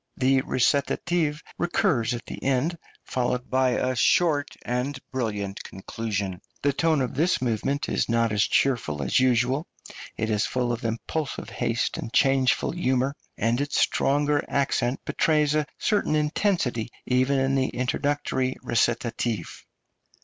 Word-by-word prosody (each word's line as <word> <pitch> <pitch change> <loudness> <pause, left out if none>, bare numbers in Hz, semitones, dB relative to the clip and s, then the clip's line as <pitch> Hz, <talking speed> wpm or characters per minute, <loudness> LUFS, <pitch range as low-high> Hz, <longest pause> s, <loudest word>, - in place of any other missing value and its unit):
The 130 +1 +3
recitative 150 +5 0 0.2
recurs 125 -9 +1
at 120 - -8
the - - -8
end, 135 +6 0 0.2
followed 125 0 -2
by 130 -1 +3
a 130 0 0
short 145 +2 +3
and 125 +3 -2
brilliant 105 -6 -3
conclusion. 95 -1 -4 0.2
The 140 0 +3
tone 160 0 +2
of 125 - -2
this 165 +7 +2
movement 130 +4 -1
is - - 0
not 115 -1 +2
as 105 -1 +1
cheerful 100 - +1
as 70 - +2
usual; 130 +4 +2 0.5
it 110 0 -1
is 105 -1 +1
full 125 -1 -1
of 120 0 -3
impulsive 120 +5 -3
haste - - -1
and 115 - -5
changeful 135 -1 +3
humour, 135 -4 0 0.2
and 115 +4 +1
its 145 +1 0
stronger 145 +1 +2
accent 135 -2 0
betrays 150 -2 +2
a 155 -1 +1
certain 205 -7 +1
intensity, 150 - 0 0.2
even 130 +2 +2
in 135 0 +1
the 130 -1 +2
introductory 130 +1 -1
recitative. 115 -4 -1
130 Hz, 135 wpm, -25 LUFS, 120-145 Hz, 0.5 s, The